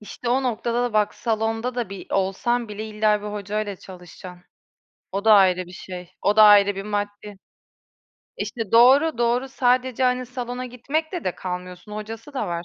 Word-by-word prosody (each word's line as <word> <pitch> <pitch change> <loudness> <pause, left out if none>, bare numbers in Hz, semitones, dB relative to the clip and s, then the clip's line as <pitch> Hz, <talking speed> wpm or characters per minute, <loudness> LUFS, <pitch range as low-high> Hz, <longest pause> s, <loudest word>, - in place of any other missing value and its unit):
İşte, 225 +3 -7
o 260 +2 +2
noktada 240 0 -1
da 245 -2 -2
bak 210 -1 +1
salonda 225 +2 -2
da 240 -5 -3
bi 195 - -8
olsan 220 +5 0
bile 210 +1 -6
illa 210 -1 +1
bir - - -6
hocayla 205 0 -4
çalışacaksın. 180 -1 -12 0.7
O 200 +2 -3
da 220 - +7
ayrı 185 -2 +4
bir 180 - -13
şey. 180 -1 -9
O 205 +2 +2
da 215 - +8
ayrı 205 -1 +6
bir 195 - -5
maddi. 205 -1 -4 1.0
İşte, 225 -5 -5
doğru, 265 +5 +5
doğru. 240 +3 +1
Sadece, 255 0 +1
hani, 250 0 +1
salona 250 0 -5
gitmekle 310 +8 -3
de 185 - -1
kalmıyorsun, 180 +2 -7
hocası 225 +6 -8
da - - -2
var. 170 0 -4
215 Hz, 170 wpm, -23 LUFS, 195-245 Hz, 1.0 s, da